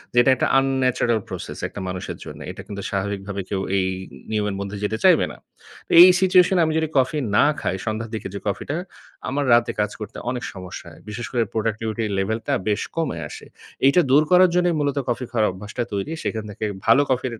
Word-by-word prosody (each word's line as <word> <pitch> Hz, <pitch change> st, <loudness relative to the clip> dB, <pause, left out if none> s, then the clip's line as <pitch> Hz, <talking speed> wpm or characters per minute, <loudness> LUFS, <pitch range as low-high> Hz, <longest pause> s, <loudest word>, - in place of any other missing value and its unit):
যেটা 120 Hz, +2 st, +5 dB
একটা -, -, 0 dB
unnatural 130 Hz, -3 st, +2 dB
process 95 Hz, -3 st, -6 dB
একটা -, -, -9 dB
মানুষের 90 Hz, 0 st, -5 dB
জন্য, -, -, -9 dB
এটা -, -, -9 dB
কিন্তু 100 Hz, -1 st, -6 dB
স্বাভাবিকভাবে 100 Hz, 0 st, -3 dB
কেউ 95 Hz, -1 st, -1 dB, 0.2 s
এই 95 Hz, -1 st, +1 dB, 0.4 s
নিয়মের 105 Hz, -2 st, -1 dB
মধ্যে 100 Hz, +1 st, -5 dB
যেতে 110 Hz, +2 st, -1 dB
চাইবে -, -, +6 dB
না। -, -, -11 dB, 0.6 s
এই 175 Hz, -, +13 dB, 0.2 s
সিচুয়েশন 185 Hz, 0 st, +5 dB
এ -, -, +5 dB
আমি 155 Hz, -, 0 dB
যদি 160 Hz, 0 st, +1 dB
কফি 130 Hz, +4 st, +2 dB, 0.2 s
না -, -, +6 dB, 0.2 s
খাই, 90 Hz, -, -1 dB
সন্ধ্যার 110 Hz, 0 st, -3 dB
দিকে 110 Hz, -, -5 dB
যে 100 Hz, -, -4 dB
কফিটা 100 Hz, +9 st, -2 dB, 0.5 s
আমার 140 Hz, +2 st, -1 dB
রাতে 120 Hz, 0 st, +4 dB
কাজ 105 Hz, 0 st, +1 dB
করতে 105 Hz, 0 st, -7 dB
অনেক 125 Hz, -1 st, -3 dB
সমস্যা 90 Hz, -2 st, -8 dB
হয়। -, -, -16 dB
বিশেষ 110 Hz, +3 st, -5 dB
করে 120 Hz, -2 st, +2 dB
প্রোডাক্টিভিটির 110 Hz, 0 st, -2 dB
লেভেল 110 Hz, +4 st, -1 dB
টা -, -, +1 dB
বেশ 105 Hz, -1 st, +1 dB
কমে 160 Hz, -, -1 dB
আসে। -, -, -10 dB, 0.4 s
এইটা 140 Hz, +6 st, +6 dB
দূর 145 Hz, +3 st, +6 dB
করার 180 Hz, 0 st, +7 dB
জন্যই 175 Hz, -1 st, +2 dB
মূলত 145 Hz, -1 st, 0 dB
কফি 120 Hz, +1 st, -1 dB
খাওয়ার 110 Hz, -3 st, +2 dB
অভ্যাসটা 105 Hz, +6 st, -5 dB
তৈরি। 100 Hz, +8 st, -2 dB
সেখান 110 Hz, -1 st, -2 dB
থেকে 105 Hz, +1 st, -4 dB, 0.2 s
ভালো 115 Hz, +5 st, +6 dB
কফির 130 Hz, -1 st, 0 dB
115 Hz, 195 wpm, -22 LUFS, 100-135 Hz, 0.6 s, এই